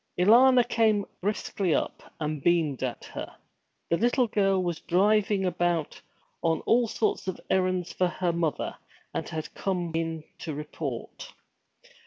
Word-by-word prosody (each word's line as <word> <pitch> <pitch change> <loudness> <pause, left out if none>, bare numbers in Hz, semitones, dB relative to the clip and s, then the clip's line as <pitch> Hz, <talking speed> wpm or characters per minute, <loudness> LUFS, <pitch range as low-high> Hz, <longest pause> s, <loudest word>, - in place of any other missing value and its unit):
Alanna 245 +6 +6
came 215 -3 +2 0.2
briskly 195 -3 0
up, - - -2 0.2
and 150 -2 -2
beamed 165 -6 +2
at 130 -2 -3
her. - - -7 0.6
The 170 - +4
little 245 +4 +3
girl 195 -4 +2
was 175 -3 -2
driving 205 +2 +2
about 175 -3 -1 0.4
on 165 -1 +1
all 235 +1 +3
sorts 215 -2 -1
of 185 - -3
errands 185 -2 +1
for 180 - +2
her 175 -1 -1
mother, 165 -3 -1 0.4
and - - -3
had 160 -1 -5
come 180 -3 -2
in 165 -1 -2 0.2
to 155 -3 -5
report. 150 - -6
180 Hz, 140 wpm, -27 LUFS, 165-210 Hz, 0.6 s, Alanna